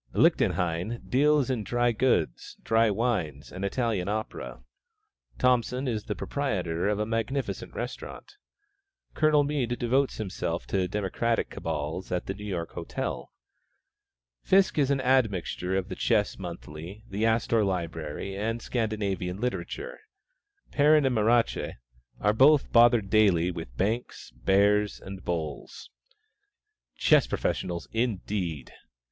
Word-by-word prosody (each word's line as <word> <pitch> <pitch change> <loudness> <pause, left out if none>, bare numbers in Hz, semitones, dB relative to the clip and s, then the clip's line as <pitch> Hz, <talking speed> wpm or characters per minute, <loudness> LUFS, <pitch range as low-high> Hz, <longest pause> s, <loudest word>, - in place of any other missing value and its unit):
Lichtenhein 90 +7 +1
deals 145 0 +3
in 120 -4 -1
dry 120 +2 +1
goods, 125 +3 0
dry 115 0 +3
wines 100 - -1
and 95 +2 -6
Italian 105 -3 -1
opera; 110 +3 -4 0.7
Thompson 125 +1 +1
is 110 -4 -2
the - - -3
proprietor 95 -11 -2
of 105 - 0
a 105 - 0
magnificent 115 +5 -3
restaurant; - - -7 0.8
Colonel 155 -1 +4
Mead 135 -5 -1
devotes 130 +3 +1
himself 90 -4 -3
to 95 -2 0
democratic 105 +4 -1
cabals 80 +3 -4
at 90 -1 -1
the 95 - -3
New 105 +1 -8
York 85 -4 -3
Hotel; - - -5 1.1
Fiske 190 -4 +3
is 140 -2 +3
an 140 -1 +1
admixture 105 -7 +1
of 95 -1 -2
the - - -5
Chess 105 -2 +1
Monthly, 85 +2 -8
the 100 +3 -3
Astor 115 0 +2
Library 85 -1 -3
and 115 +3 -2
Scandinavian 105 -6 -2
literature; 400 - -4 0.7
Perrin 150 0 +5
and 130 - +2
Marache 115 +1 +2 0.5
are 105 +1 +2
bothered 120 -5 +5
daily 95 -5 +4
with 80 -8 -8
banks, 110 +5 -2
"bears" 100 +11 +2
and 95 -1 -9
"bulls." 80 -4 -5 1.1
Chess 150 -4 +4
professionals, 85 -1 -2
indeed! 95 - -2
105 Hz, 120 wpm, -27 LUFS, 90-120 Hz, 1.1 s, Perrin